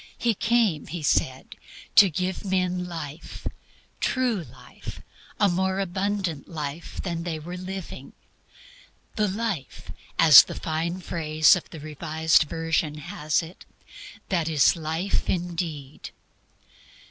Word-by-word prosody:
He 235 -1 +1
came, 220 -7 +1
He 165 +1 -5
said, 130 -2 0 0.4
to 200 - +8
give 185 +3 -3
men 180 -2 0
life, 160 -2 -8 0.5
true 245 -8 0
life, - - -11 0.4
a 205 - +5
more 190 +1 0
abundant 190 -4 -2
life 155 0 -6
than 170 -3 -3
they 170 -2 -3
were 170 +4 -7
living; 185 0 -7 1.0
"the 210 -1 +2
life," 200 - -4 0.3
as 160 -4 +10
the - - -7
fine 170 +3 -2
phase 155 -1 +3
in 180 - -3
the 160 - -9
Revised 155 +2 +1
Version 165 -1 -1
has 150 +1 -1
it, 165 +3 -11 0.7
"that 170 -4 0
is 155 0 +4
life 165 +4 -2
indeed." 165 -6 -3
170 Hz, 120 wpm, -25 LUFS, 155-190 Hz, 1.0 s, as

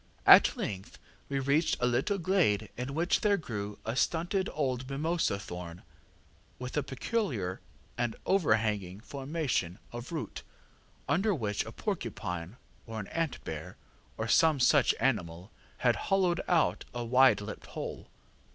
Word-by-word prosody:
At - - +8
length 95 -1 -5 0.3
we 140 - -1
reached 140 +4 +2
a 125 - +2
little 125 +11 +1
glade 160 - +2
in 125 +3 -4
which 170 +3 +2
there 205 -1 +3
grew 105 - -5
a 115 +2 -2
stunted 175 - 0
old 130 -3 -2
mimosa 155 -5 0
thorn, 90 -3 -8 0.7
with 125 0 -6
a 150 - +2
peculiar 130 - -2 0.4
and 120 -2 0
overhanging 110 - +1
formation 135 - -2
of 120 +4 -7
root, 160 -3 -4 0.7
under 190 +9 +2
which 105 -7 -1
a 110 - -7
porcupine, 110 - -4 0.3
or 110 -1 -5
an 100 - -6
ant 165 -4 -2
bear, - - -6 0.4
or 110 - -2
some 155 +4 +4
such 135 +1 +4
animal, 95 -7 -1 0.3
had 120 -2 +2
hollowed 185 -3 +2
out 170 -3 +2
a 120 -1 -2
wide 130 +3 +5
lipped 105 +1 -7
hole. - - -6
125 Hz, 140 wpm, -30 LUFS, 105-160 Hz, 0.7 s, At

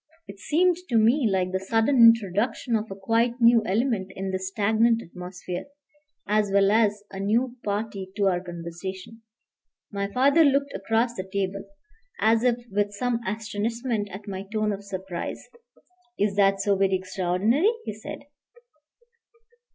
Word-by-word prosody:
It 200 0 -11
seemed 350 - +2
to 240 - -1
me 230 +3 +4
like 185 -1 0
the 190 - -1
sudden 225 +7 +1
introduction 230 +1 +4
of 220 0 -2
a 195 - -6
quite 230 +5 0
new 235 -1 +6
element 210 -2 0
in 190 0 -4
the 190 - -2
stagnant 220 +4 +2
atmosphere, 180 0 -7 0.6
as 210 0 +2
well 200 0 +4
as 210 -2 +2
a 195 - -7
new 235 +5 0
party 205 -2 -3
to 205 -1 +1
our 180 -2 +2
conversation. 180 +5 -8 0.7
My 200 -1 -3
father 280 +8 +4
looked 280 -1 +2
across 230 +2 0
the 190 -4 -7
table, 195 0 -2 0.5
as 225 +1 +3
if 250 -2 +3 0.2
with 205 +1 0
some 240 +2 -1
astonishment 220 +1 -2
at 195 +2 -10
my 190 -1 -5
tone 215 -1 0
of 200 0 -7
surprise. 190 -3 -6 0.7
"Is 200 -1 0
that 195 -1 +3
so 200 0 +2
very 195 0 +2
extraordinary?" 190 - +1
he - - -4
said. 215 - -9
205 Hz, 150 wpm, -25 LUFS, 190-230 Hz, 0.7 s, new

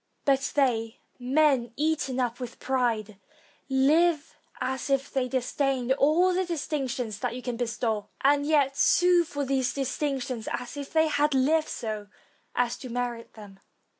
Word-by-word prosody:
But 275 -1 +1
they, 235 -4 +1 0.2
men 260 -2 +2
eaten 295 -3 0
up 245 -1 -1
with 245 -2 -7
pride, 225 -6 -1 0.5
live 300 +4 +2 0.2
as 265 +2 -3
if 275 0 0
they 260 -2 0
disdained 260 0 -1
all 310 +7 +3
the 370 +1 +1
distinctions 270 - -3
that 245 -1 -2
you 250 - -7
can 245 -2 -3
bestow, 230 -3 -2
and 285 +1 +4
yet 285 -2 +2
sue 355 +3 +4
for 285 -3 -4
those 265 -2 0
distinctions 265 -3 -2
as 250 +3 -4
if 285 -1 -7
they 320 0 +3
had 295 -1 +1
Hved 305 +4 +2
so 215 -2 -5 0.5
as 245 -1 0
to 255 - -9
merit 240 -1 -4
them. 205 -3 -13
265 Hz, 150 wpm, -27 LUFS, 245-290 Hz, 0.5 s, and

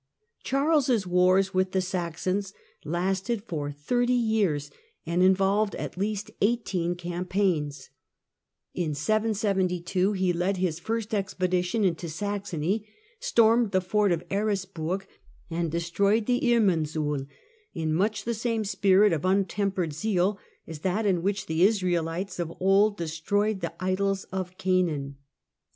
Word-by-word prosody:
Charles' 275 -6 +2
wars 185 +2 +3
with 185 0 +1
the 190 - +2
Saxons 185 +2 -2 0.3
lasted 190 +7 -1
for 150 -9 -4
thirty 245 - 0
years 205 -12 +1
The - - -28
Saxon 440 - -11
and 175 - +2
involved 195 +2 +3
at - - -5
least 205 +2 -3
eighteen 200 -6 0
campaigns. 175 -5 -2 0.8
In 160 -5 -2
772 195 - 0
he 190 -2 +1
772 170 - -3
ipaigDS - - -4
' - - +2
led 195 +1 0
his 175 -3 -1
first 225 +3 -3
expedition 185 0 0
into 170 -2 -1
Saxony, 200 +2 -2 0.3
stormed 235 - +4
the 190 -1 +2
fort 200 +2 +1
of 170 -1 -1
Eresburg 195 -3 -1 0.5
and 170 0 -1
destroyed 200 +6 +1
the 250 +1 +1
Irminsul 155 - +1 0.2
— 440 -2 -36
in 160 -2 -1
much 205 +6 0
the 235 - -1
same 230 0 -1
spirit 195 0 +4
of 155 - -2
untempered 190 -2 0
zeal 195 +3 0 0.3
as 160 -2 -8
that 190 +6 -1
in 185 -4 +2
which 195 +1 -1
the 160 -2 -1
Israelites 180 -2 +1
of 170 -1 -2
old 200 +2 +3
destroyed 190 +6 -1
the 170 - -4
idols 195 +1 0
of 185 -1 -4
Canaan. 160 -7 0
190 Hz, 140 wpm, -27 LUFS, 175-210 Hz, 0.8 s, stormed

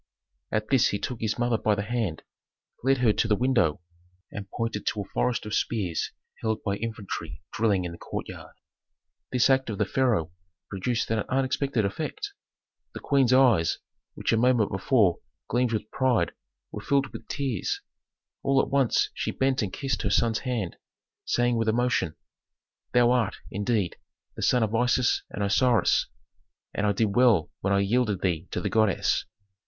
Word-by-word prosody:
At 110 0 -1
this 130 -4 +4
he 100 - -1
took 120 +3 -5
his 110 -1 -1
mother 120 -2 +1
by 105 - +2
the 100 - -2
hand, 110 -7 -2 0.6
led 135 +1 +3
her 110 - +5
to 115 - +1
the 105 - +3
window, 120 - +1 0.5
and 100 -1 -7
pointed 115 -1 -3
to 105 - 0
a 100 - -8
forest 125 -3 0
of 105 - -5
spears 95 -9 -1 0.3
held 110 -1 -1
by 100 -1 -1
infantry 100 -7 -5
drilling 100 -5 +1
in 85 - -4
the 85 - -10
courtyard. - - -7 0.8
This 125 -1 +4
act 130 -2 +2
of 105 - -3
the - - +1
pharaoh 115 -11 +1 0.4
produced 115 +4 -1
an 110 - +1
unexpected 130 -3 0
effect. 280 - -4 0.6
The - - -4
queen's 135 -3 +2
eyes, 125 -10 +4 0.4
which - - 0
a - - +3
moment 120 -2 +3
before 95 -2 +2 0.3
gleamed 120 0 +1
with 110 -1 -3
pride, 130 -3 +1 0.4
were - - -6
filled 140 -1 0
with - - -9
tears. 135 -9 -2 0.6
All 135 0 +2
at - - 0
once 135 -4 +2
she - - -3
bent 130 -1 +1
and 100 -4 -2
kissed 135 0 -2
her 105 - 0
son's 110 +2 +2
hand, 120 -9 -3 0.5
saying 120 -1 +1
with 115 -1 +1
emotion, 120 -8 +1 0.8
"Thou 120 0 +4
art, 120 -5 +1 0.2
indeed, 100 -2 -1 0.4
the - - -7
son 125 -2 +3
of 110 0 -1
Isis 125 +2 +2
and 105 - -4
Osiris, 120 +3 +3 0.7
and 105 - 0
I - - +3
did 100 0 0
well 120 -10 +4
when 95 - 0
I 100 0 +3
yielded 105 -1 +1
thee 85 -4 -1
to - - -3
the - - -1
goddess. 110 -4 +2
115 Hz, 170 wpm, -27 LUFS, 100-125 Hz, 0.8 s, her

